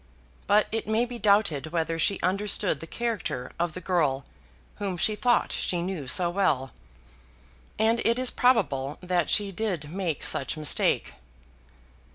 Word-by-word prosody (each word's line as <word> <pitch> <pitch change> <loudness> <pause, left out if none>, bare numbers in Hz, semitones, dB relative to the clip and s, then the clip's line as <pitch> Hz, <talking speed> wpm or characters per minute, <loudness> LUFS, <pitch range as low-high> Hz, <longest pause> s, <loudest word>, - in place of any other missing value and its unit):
But 210 +1 +4
it 225 -1 -3
may 220 +2 +1
be 240 -1 -8
doubted 200 -9 +2
whether 165 0 -2
she 195 +4 +1
understood 195 -3 0
the 165 - -9
character 220 - -3
of 170 -2 -1
the 185 - -6
girl 150 -7 0 0.5
whom 195 -3 -3
she 215 +5 +1
thought 240 +2 +1
she 175 -1 -1
knew 175 -7 -4
so 175 +7 +5
well, 150 -9 0 1.1
and 225 +2 +2
it 230 +1 +2
is 255 -1 +1
probable 150 - +1
that 180 -2 0
she 205 -1 +2
did 180 -7 -3
make 175 -5 -3
such 135 - 0
mistake. 155 -2 +1
185 Hz, 150 wpm, -26 LUFS, 160-215 Hz, 1.1 s, so